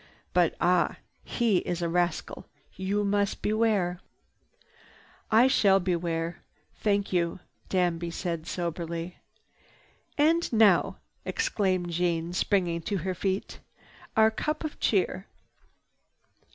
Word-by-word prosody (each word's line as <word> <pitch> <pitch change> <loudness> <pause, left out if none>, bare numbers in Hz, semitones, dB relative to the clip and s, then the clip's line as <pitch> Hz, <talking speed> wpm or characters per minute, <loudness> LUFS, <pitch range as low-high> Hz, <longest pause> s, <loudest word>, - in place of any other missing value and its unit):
But - - +3
ah! - - +2 0.3
He 230 -5 +1
is 175 0 -2
a - - +1
rascal! 175 -1 -1 0.3
You 195 +3 -1
must 200 0 0
beware!" 210 -5 +1 1.3
"I 225 +3 +6
shall 200 -7 +4
beware. 170 -2 -2 0.3
Thank 200 -2 0
you," 170 0 0 0.3
Danby 175 -2 0
said 170 -1 -4
soberly. 170 0 -4 1.0
"And 325 +3 +3
now!" 215 -6 +4 0.3
exclaimed 190 - 0
Jeanne, 170 0 -1
springing 180 -3 +1
to 200 +4 -2
her 190 - 0
feet, 190 +2 -3 0.6
"Our 220 0 +6
cup 305 +8 -3
of 310 - -5
cheer!" 195 -1 0
185 Hz, 105 wpm, -28 LUFS, 170-210 Hz, 1.3 s, I